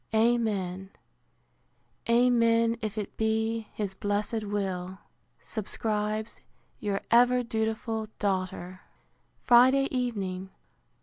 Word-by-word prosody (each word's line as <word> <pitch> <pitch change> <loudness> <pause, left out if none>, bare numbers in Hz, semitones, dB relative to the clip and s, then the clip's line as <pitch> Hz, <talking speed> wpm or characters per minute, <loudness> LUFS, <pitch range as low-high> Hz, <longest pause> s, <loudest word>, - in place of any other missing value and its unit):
Amen, 210 -5 +1 1.2
amen, 230 -1 +4
if 215 0 -4
it 210 -2 -4
be 220 0 0
his 205 -3 -4
blessed 205 +3 -1
will, 190 -2 -3 0.5
subscribes 215 0 -3 0.4
Your 200 -2 -2
ever 245 +1 +5
dutiful 220 -1 -2
DAUGHTER! 185 -2 -2 0.6
Friday 260 +3 +6
evening. 195 -7 -2
220 Hz, 80 wpm, -28 LUFS, 200-230 Hz, 1.2 s, Friday